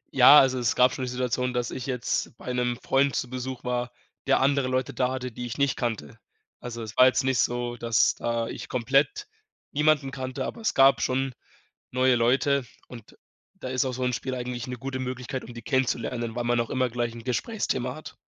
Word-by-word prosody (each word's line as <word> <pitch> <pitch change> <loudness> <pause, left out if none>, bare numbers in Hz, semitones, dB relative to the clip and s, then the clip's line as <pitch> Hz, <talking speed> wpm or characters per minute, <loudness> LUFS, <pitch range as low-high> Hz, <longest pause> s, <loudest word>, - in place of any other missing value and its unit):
Ja, 135 +3 +9
also, 130 -1 +3
es 120 -1 +1
gab 125 0 +4
schon 130 - -3
die 125 - -4
Situation, 125 0 -1
dass 120 -1 -2
ich 130 +1 -6
jetzt 125 -2 -2
bei 125 - -5
'nem 125 -1 0
Freund 135 0 +2
zu - - -1
Besuch 130 0 -5
war, 125 0 -2 0.4
der - - +4
andere 140 -1 +2
Leute 130 0 -1
da 125 0 0
hatte, 130 -1 -4
die 120 +2 -6
ich 120 - -6
nicht 140 -2 +1
kannte. 110 - -4 0.4
Also, 120 -1 -6
es 110 -2 -8
war 130 - +8
jetzt 130 +1 +2
nicht 130 -2 +1
so, 120 0 -1
dass 115 -2 +2
da 115 -1 -2
ich - - -7
komplett 135 - +1 0.4
niemanden 150 -2 +2
kannte, 130 0 -4
aber 235 - -6
es 220 - 0
gab 135 0 +6
schon 130 0 0 0.6
neue 130 0 +3
Leute 130 +3 +2 0.2
und 115 -4 -13 0.4
da 130 - -7
ist 130 0 0
auch 130 - -2
so 130 - -3
'n 125 0 0
Spiel 130 +2 -3
eigentlich 125 -1 -4
'ne 125 - -5
gute 130 +2 -5
Möglichkeit, 130 0 -4
um 120 - -10
die 115 - -8
kennenzulernen, 120 -2 -1
weil 120 - -2
man 120 0 +1
auch 115 - -2
immer 130 -1 +1
gleich 120 0 -2
'n 115 -1 -10
Gesprächsthema 130 - -2
hat. 155 - -10
125 Hz, 215 wpm, -26 LUFS, 120-130 Hz, 0.6 s, Ja